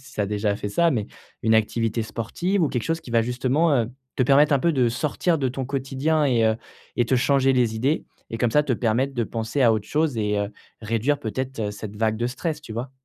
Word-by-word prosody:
tu - - 0
as - - +1
déjà 105 0 0
fait 105 - -4
ça 170 +10 +3
mais, 110 -7 -1 0.3
une 110 0 +3
activité 115 +1 +1
sportive 170 - -2
ou 160 - +3
quelque 120 -3 -2
chose 165 0 -1
qui - - -12
va 115 -1 +3
justement, 130 +7 +1
heu, 115 -3 +1 0.3
te - - +1
permettre 140 +4 +5
un 140 - +4
peu 170 +5 +2
de 130 -5 +2
sortir 150 +7 0
de 135 - +1
ton 130 +1 -4
quotidien 140 +3 0
et 120 -5 +2
heu 110 0 +3 0.4
et 120 - +3
te 130 - +2
changer 135 +1 +3
les 120 -3 +2
idées. 135 +8 0 0.2
Et 115 - -4
comme 120 -1 +1
ça, 150 - +5
te 145 -3 0
permettre 120 +4 0
de 120 - +1
penser 115 +5 -2
à 115 -2 +6
autre 105 -1 -3
chose 155 -3 +1
et 105 -1 0
heu, 100 0 -2 0.3
réduire 115 +6 0
peut-être, 130 +2 -4
heu, 105 -2 -1
cette 105 0 -8
vague 110 +1 +1
de 120 +2 0
stress, 155 +4 -3
tu 115 - -9
vois? 120 +4 -4
125 Hz, 245 wpm, -24 LUFS, 110-140 Hz, 0.4 s, à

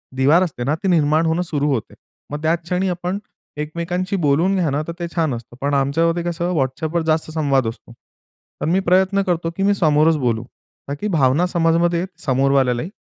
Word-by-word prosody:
दिवार 145 +8 +4
असते 145 -8 -4
ना 145 +5 +1
ती 195 - 0
निर्माण 155 -2 +3
होणं 160 +2 +1
सुरु 150 -3 -1
होते. 115 - -4 0.4
मग 150 - -4
त्याच 165 +2 +2
क्षणी 180 +2 -1
आपण 180 +2 -3 0.4
एकमेकांशी 170 +5 -3
बोलून 170 +3 +2
घ्या 175 -5 +1
ना, 145 +2 -1
तर 170 - -4
ते 170 - -3
छान 160 -5 +1
असतं. 120 +1 -10
पण 145 +1 0
आमच्यामध्ये 165 +5 +1
कसं 175 +1 -2
WhatsAppवर 155 +5 -1
जास्त 155 0 0
संवाद 140 -6 +1
असतो. 115 +1 -8 0.7
तर - - -1
मी 180 +3 +3
प्रयत्न 190 +2 +3
करतो, 170 -2 0
की 195 - 0
मी 200 +1 +4
समोरच 155 -2 +3
बोलू. 120 -3 0 0.4
ताकी 145 +9 -3
भावना 155 -2 +2
समजमध्ये 170 +1 +1 0.2
समोरवाल्यालाही. 135 +1 +2
160 Hz, 180 wpm, -20 LUFS, 140-175 Hz, 0.7 s, दिवार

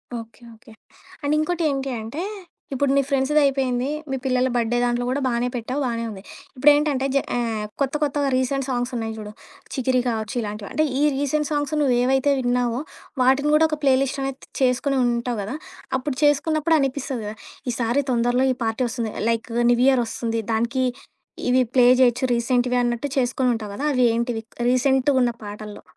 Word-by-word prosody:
Okay, 230 +1 -9
okay. 225 0 -18 0.5
And 285 +1 +1
ఇంకోటి 335 +2 0
ఏంటి 275 -1 -2
అంటే, 230 +9 -5 0.5
ఇప్పుడు 270 +1 +1
ని - - +5
ఫ్రెండ్స్‌దయిపోయింది, 270 -2 +2 0.2
మీ 270 - -1
పిల్లల 255 -1 +2
బర్త్‌డే 240 0 +1
దాంట్లో 245 0 0
కూడా 270 +3 -1
బానే 240 0 0
పెట్టావు, 250 +4 -3
బానే 230 -2 -2
ఉంది. 195 -2 -9 0.3
ఇప్పుడేంటంటే, 290 0 +3
జ - - +6 0.2
ఆహ్, 225 -3 -1 0.2
కొత్త 270 -1 +1
కొత్తగా 285 -1 0
రీసెంట్ 265 +1 0
సాంగ్స్ 245 0 -1
ఉన్నాయి 225 -1 -3
చూడు, 210 -1 -7 0.4
చికిరి 255 -1 +1
కావచ్చు 220 -1 -3
ఇలాంటివ 210 -1 -6
అంటే 310 - +2
ఈ - - +1 0.2
రీసెంట్ 285 +1 0
సాంగ్స్ 290 -1 -1
నువ్వేవైతే 265 +1 +3
విన్నావో, 245 -1 0 0.4
వాటిని 270 +3 +3
కూడా 320 +1 +5
ఒక 305 - -2
ప్లే 270 -2 +5
లిస్ట్ 275 +1 -3
అనేది 270 0 -6
చేసుకొని 265 +2 +2
ఉంటావు 240 -1 -1
గదా! 215 +8 -5 0.4
అప్పుడు 260 +1 -3
చేసుకున్నప్పుడు 310 +2 +3
అనిపిస్తది 270 -2 -2
కదా! 210 - -6 0.4
ఈసారి 240 +4 0
తొందరలో 245 +2 +2
ఈ - - -11
పార్టీ 225 +3 -1
వస్తుంది, 230 -2 -3 0.2
లైకు 230 0 -2 0.2
న్యూ 240 - +3
ఇయర్ 260 -3 +4
వస్తుంది. 230 0 -2
దానికి 235 +4 0 0.6
ఇవి 255 +1 +4
ప్లే 250 -2 +5 0.2
చేయొచ్చు, 245 0 +3
రీసెంట్‌గా 245 +1 +1
అన్నట్టు 240 +3 -1
చేసుకొని 250 0 +1
ఉంటావు 215 -2 -6
కదా! 285 - -3
అవి 250 -1 +3
ఏంటివి? 235 -1 -2 0.3
రీసెంట్‌గున్న 260 0 +3
పాటల్లో. 210 0 -8
255 Hz, 165 wpm, -23 LUFS, 235-275 Hz, 0.6 s, జ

